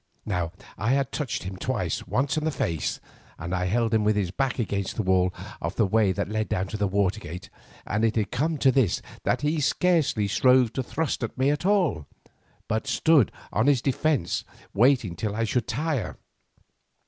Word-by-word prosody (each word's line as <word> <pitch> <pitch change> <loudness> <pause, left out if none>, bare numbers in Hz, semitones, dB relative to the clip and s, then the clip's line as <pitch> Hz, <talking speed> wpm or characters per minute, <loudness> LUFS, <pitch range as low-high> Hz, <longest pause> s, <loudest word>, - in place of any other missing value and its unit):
Now 90 -5 -1 0.3
I 115 +5 +1
had 140 -1 0
touched 145 -6 -3
him 95 0 -6
twice, - - -2
once 135 +3 0
in 155 - -1
the 160 - +1
face, 85 - -2 0.4
and 85 +2 -5
I 90 0 0
held 115 +4 +1
him 110 -1 +3
with 105 0 +2
his 95 -4 0
back 135 +5 -1
against 100 -5 -2
the 110 - -1
wall 95 -1 +3 0.3
of 85 +3 -3
the 110 - +3
way 105 0 +3
that 100 0 -2
led 110 -1 -2
down 95 - 0
to 110 - -4
the 100 -1 +1
water 100 +1 +1
gate, 90 0 -8 0.3
and 105 +2 -1
it 115 -1 +2
had 105 -3 0
come 155 +4 0
to 135 -2 +4
this, 130 -8 +1 0.2
that - - +1
he 150 +2 0
scarcely 150 - +2
strove 125 +2 +4
to 130 - -1
thrust 145 +1 -2
at 120 - -4
me 135 +2 +3
at 150 +5 -1
all, 175 - +1 0.6
but 110 0 -1
stood 155 - +4 0.2
on 110 +5 +2
his 140 -3 +4
defence 140 - 0 0.3
waiting 120 -5 +3
till 105 +3 -3
I 115 - 0
should 115 +1 0
tire. 140 - -2
110 Hz, 195 wpm, -26 LUFS, 95-135 Hz, 0.6 s, to